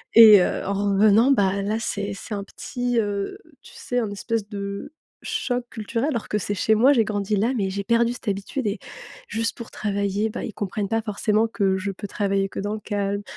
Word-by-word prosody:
et 220 -3 +10
heu, - - 0
en 200 - -1 0.2
revenant, 215 +6 +5
bah 200 -4 +2
là, 210 +2 -1
c'est 200 -3 -3
c'est 210 - -7
un 200 0 -5
petit, 245 +3 -3
heu, 205 - -2 0.2
tu - - -15
sais, 245 0 -2
un 220 - -1
espèce 210 +1 -2
de 200 +5 -5 0.3
choc 260 - -2
culturel, 230 +4 -2
alors 235 -4 -3
que 210 - +1
c'est 205 0 -2
chez 220 +3 +2
moi, 260 +6 +5
j'ai 235 -5 +4
grandi 210 -1 -1
là, 225 +5 +2
mais 195 -4 0
j'ai 200 +1 -3
perdu 235 +2 +2
cette 245 - -5
habitude 200 +6 -3
et 200 0 -2 0.5
juste 225 0 -2
pour 235 - -8
travailler, 200 +1 -1
bah, - - -5
ils 220 - -6
comprennent 205 +1 -3
pas 225 0 +1
forcément 215 0 +1
que 195 -4 +1
je 195 +1 -3
peux 200 +2 -7
travailler 195 -1 0
que - - -6
dans 205 +1 -2
le 215 - -4
calme. 200 -1 -2
210 Hz, 215 wpm, -24 LUFS, 200-230 Hz, 0.5 s, et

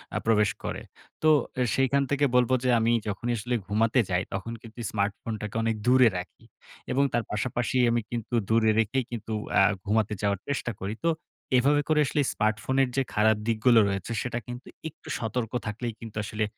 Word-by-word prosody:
আ - - +2
প্রবেশ 105 -2 +4
করে। - - -4 0.4
তো 155 - +5 0.3
এ - - +2
সেইখান 135 +1 +2
থেকে 140 +1 +3
বলবো 125 0 +4
যে, 125 - +1
"আমি 115 +1 +2 0.2
যখনি 110 +4 -2
আসলে 120 +3 -2
ঘুমাতে 110 +4 +2
যাই, 90 +1 +1
তখন 100 +4 -4
কিন্তু 115 +1 -13
স্মার্টফোন 100 +2 -2 0.3
অনেক 115 0 0
দূরে 130 -1 +6
রাখি" 90 -2 -8 0.5
এবং 135 +2 +3
তার 120 -1 +1
পাশাপাশি 120 +3 -1
আমি 120 - +1
কিন্তু 120 0 -5 0.2
দূরে 110 -1 +4
রেখেই 120 +5 +1
কিন্তু 110 -1 -6 0.3
আ - - +7 0.2
ঘুমাতে 110 0 +1
যাওয়ার 100 -2 0
চেষ্টা 135 -4 -2
করি। 100 +3 -3
তো - - +4 0.5
এভাবে 145 +4 +3
করে 155 -1 +3
আসলে 145 +2 0
স্মার্টফোনের 115 +5 +1
যে 135 - +3
খারাপ 110 0 +3
দিকগুলো 115 +1 +4
রয়েছে, 100 +3 -3
সেটা 120 -1 -3
কিন্তু 125 +1 -8 0.2
একটু 155 - -20
সতর্ক 115 0 -2 0.2
থাকলেই 115 +2 -3
কিন্ত 115 -2 -9
আসলে 110 +1 -2
115 Hz, 175 wpm, -27 LUFS, 105-125 Hz, 0.5 s, আ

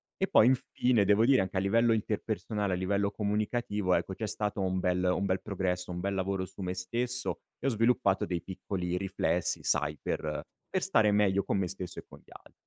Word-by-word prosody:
E 190 - 0
poi, - - +6
infine, 125 -3 +2
devo 105 +3 +4
dire 130 -3 +5
anche 95 0 -3
a - - +4
livello 115 +4 +3
interpersonale, 105 -1 -2
a - - +2
livello 100 +2 0
comunicativo, 105 -2 0
ecco, 95 - -1
c'è 110 +2 -4
stato 105 -1 -2
un 95 0 0
bel 90 0 0
un 90 +2 +1
bel 95 -1 0
progresso, 90 -3 -2
un 90 - -4
bel 100 +2 -1
lavoro 95 0 -1
su 95 - -11
me 90 -1 -2
stesso 120 +7 -2 0.2
e - - -9
ho - - +4
sviluppato 110 -4 +2
dei 85 -2 -2
piccoli 90 -2 -4
riflessi, 90 -3 -1
sai 75 +1 +1
per 75 -1 -3 0.3
per 190 - 0
stare 110 - +3
meglio 100 -1 +3
con - - 0
me 95 -2 0
stesso 90 0 -6
e - - -11
con - - -14
gli - - -24
al - - -15
100 Hz, 210 wpm, -30 LUFS, 90-110 Hz, 0.3 s, poi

